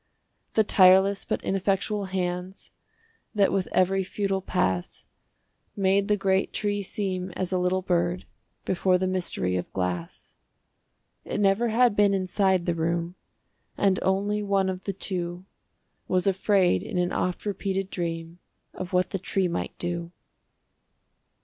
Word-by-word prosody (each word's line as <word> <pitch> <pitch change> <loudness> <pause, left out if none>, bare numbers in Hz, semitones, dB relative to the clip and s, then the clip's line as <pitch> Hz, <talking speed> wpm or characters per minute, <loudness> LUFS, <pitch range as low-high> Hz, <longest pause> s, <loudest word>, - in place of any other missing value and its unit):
The 220 - +5
tireless 190 0 +5
but - - -2
ineffectual 195 +2 0
hands 185 0 -4 0.6
That 200 -2 +3
with 195 -2 0
every 190 +1 +2
futile 195 0 -2
pass 95 - -1 0.7
Made 195 0 +2
the 210 - +2
great 195 -1 +1
tree 205 -1 -1
seem 190 -2 -3
as 185 0 -3
a 185 - +1
little 185 +1 0
bird 175 0 0 0.4
Before 185 0 +2
the 185 - -1
mystery 175 - -1
of 90 - -5
glass! 90 -2 -4 0.9
It - - -4
never 205 +4 +3
had 235 -1 +3
been 205 -1 +4
inside 190 -1 +1
the 175 - +1
room, 170 +1 -1 0.6
And 195 -2 +2
only 205 +2 0
one 195 -2 +1
of 185 0 -5
the 195 - -2
two 180 -1 -4 0.6
Was 185 -1 +1
afraid 190 - +3
in - - -5
an 180 0 +1
oft 180 +2 -2
repeated 195 -1 -2
dream 165 -1 -4 0.3
Of 185 +1 -7
what 180 0 +2
the 195 - -2
tree 190 0 0
might 170 - -4
do. 170 -1 -3
185 Hz, 140 wpm, -26 LUFS, 180-195 Hz, 0.9 s, The